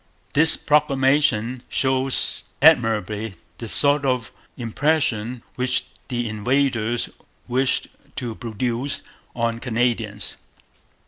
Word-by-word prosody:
This 160 +2 +6
proclamation 135 -4 +2
shows 130 0 0
admirably 110 - +3 0.2
the 115 - -6
sort 145 +3 +4
of 125 -4 -1 0.3
impression 120 -2 0
which 125 0 0 0.2
the 120 -3 -2
invaders 120 +1 0 0.4
wished 130 +2 +1 0.3
to 120 -4 -4
produce 120 +4 -2 0.3
on 115 -1 -1
Canadians. 115 -4 -1
125 Hz, 85 wpm, -22 LUFS, 115-135 Hz, 0.4 s, This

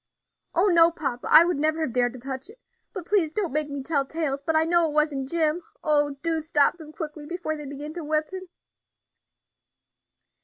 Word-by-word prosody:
"Oh! 350 +4 +4
no, 335 -4 +6
papa, 275 -7 -4
I 335 - +8
would 350 -3 0
never 310 +2 0
have 270 -7 -2
dared 245 -1 +1
to 255 - -10
touch 265 - -6
it. 450 - -14 0.3
But 370 -6 -7
please 350 -6 +1
don't 375 -7 -2
make 305 0 0
me 280 -1 -5
tell 280 -1 0
tales; 280 -1 -3
but 320 +3 -1
I 315 - +5
know 335 0 +2
it - - -6
wasn't 290 -3 0
Jim. 325 +1 0 0.2
Oh! 295 -2 +2
do 330 -1 +1
stop 310 +1 +1
them 310 -1 -11
quickly, 305 -2 -7
before 345 -2 -3
they 295 -2 -8
begin 290 +2 -7
to 345 -1 -6
whip 305 +2 -1
him." 375 -1 -7
310 Hz, 200 wpm, -25 LUFS, 285-335 Hz, 0.3 s, I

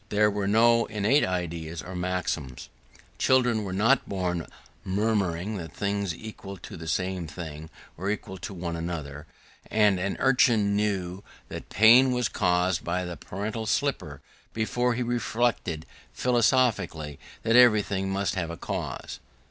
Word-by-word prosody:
There 105 0 +3
were 100 -1 -2
no 115 +2 +4
innate 110 +7 +2
ideas 85 -3 -3
or 95 +1 -8
maxims: 80 -8 -3 0.5
children 125 -4 +3
were 95 - -4
not 115 +8 +2
born 90 -4 -2 0.4
murmuring 100 -1 0
that 80 -4 -7
things 100 -4 -1
equal 100 -2 -9
to - - -10
the 80 -1 -8
same 90 -1 -1
thing 80 -1 -8 0.3
were 95 +4 -3
equal 95 -2 -4
to - - -6
one 85 -3 -4
another: 80 -3 -5 0.4
and 105 -3 +3
an 95 +2 -2
urchin 120 -6 +3
knew 100 -2 -1 0.3
that - - -8
pain 120 +5 +7
was 125 -2 0
caused 90 -1 +1
by 90 +2 -1
the 90 -1 -5
paternal 110 +6 -5
slipper - - -1 0.3
before 120 +2 0
he 125 - -1
reflected 115 -8 -1 0.3
philosophically 120 - +1 0.2
that 115 +1 +2
everything 105 -5 +4
must 95 0 -1
have 85 -3 -2
a 85 - -6
cause. - - -5
100 Hz, 140 wpm, -27 LUFS, 85-110 Hz, 0.5 s, pain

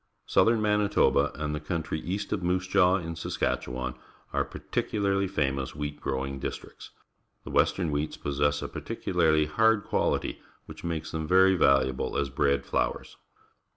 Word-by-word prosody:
Southern 115 -1 +3
Manitoba 105 -1 +3
and 75 0 -3
the 75 - -2
country 80 0 -3
east 95 +6 -3
of 100 - -2
Moose 90 +1 0
Jaw 95 -1 +4
in 85 -3 -3
Saskatchewan 65 -5 -2 0.4
are - - +2
particularly 100 -2 -1
famous 70 -8 -1
wheat 75 0 -5
growing 70 0 -3
districts. - - -7 0.5
The - - -8
western 90 -4 +2
wheats 75 +1 -2
possess 70 0 0
a - - -3
peculiarly 80 -1 +1
hard 110 +6 +3
qualit.v - - 0 0.3
which - - -11
makes 85 -2 -3
them 80 -1 -3
very 95 +2 +5
valuable 65 -5 +2
as 70 -2 -1
bread 70 +2 +1
flours. - - -2
80 Hz, 145 wpm, -28 LUFS, 70-95 Hz, 0.5 s, very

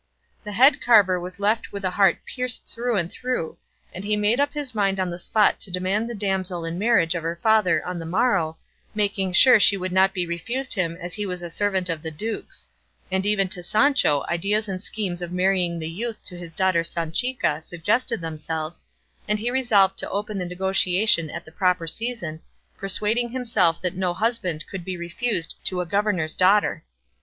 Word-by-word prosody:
The 210 -1 -6
head 260 +6 +5
carver 205 -6 +5
was 180 +2 -7
left 215 +3 0
with 200 -1 -5
a 185 - +1
heart 195 -2 +4
pierced 250 -2 -3
through 235 -1 -1
and 170 -2 -1
through, 250 -10 -3 0.3
and 185 - -7
he 210 +1 0
made 210 +4 +2
up 285 0 +2
his 290 -4 -4
mind 195 -3 +1
on 185 -1 -1
the 175 - -6
spot 210 +4 +2
to - - -6
demand 190 +5 -1
the 240 - -5
damsel 190 -4 -2
in 165 +2 -4
marriage 200 -7 +3
of 170 - -3
her 165 +1 -3
father 220 -5 +3
on 180 -1 -4
the 165 - -6
morrow, 185 -5 +1 0.4
making 200 -3 0
sure 255 +6 +7
she 200 -1 +5
would 185 0 -4
not 190 +1 +4
be 180 -2 -2
refused 235 +11 -2
him 170 -4 -1
as 175 0 -5
he 210 -1 -3
was 180 -1 -5
a 170 - -6
servant 190 -1 0
of 165 -3 -2
the 160 - -5
duke's; 215 +9 -6 0.4
and 190 +1 0
even 200 -2 +2
to 180 - -3
Sancho 215 - +2
ideas 205 +5 0
and 185 -2 -4
schemes 190 -5 -4
of 175 -1 -5
marrying 180 -1 +1
the 160 -1 -4
youth 220 +7 -5
to 180 - -8
his 170 -2 -10
daughter 190 -3 +2
Sanchica 170 - -1
suggested 205 +7 -1
themselves, 160 0 -5 0.4
and 210 0 +1
he 230 +3 -2
resolved 220 -7 +3
to - - -3
open 205 0 -3
the 180 - -3
negotiation 185 -1 +2
at - - -7
the 160 - -14
proper 180 0 +1
season, 170 -4 -3 0.3
persuading 210 +5 0
himself 230 -9 +1
that 180 -1 -1
no 180 -2 -1
husband 185 -9 -1
could 190 -3 -7
be 185 0 -5
refused 175 +1 -2
to 185 - +2
a 180 - -1
governor's 185 -4 0
daughter. 195 +3 +3
190 Hz, 195 wpm, -24 LUFS, 175-215 Hz, 0.4 s, sure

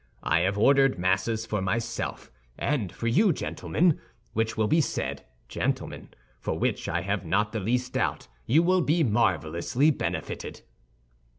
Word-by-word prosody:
I 85 - +3
have 95 +4 0
ordered 135 +3 +4
Masses 95 +5 0
for 105 -3 -2
myself, 115 +5 -3 0.3
and 125 - -1
for - - -7
you, 180 - +4
gentlemen, 165 +1 0 0.3
which 110 0 -1
will 110 - +2
be 160 +8 +4
said, - - -3 0.2
gentlemen, - - -3 0.3
for - - -3
which - - -1
I 85 +1 0
have 100 0 -2
not 100 +5 +1
the 110 - -2
least 125 +5 -1
doubt - - -1 0.2
you 150 +8 +4
will 185 +1 +3
be 160 +1 +2
marvelously 115 - +2
benefited." - - -4
115 Hz, 150 wpm, -27 LUFS, 100-140 Hz, 0.3 s, ordered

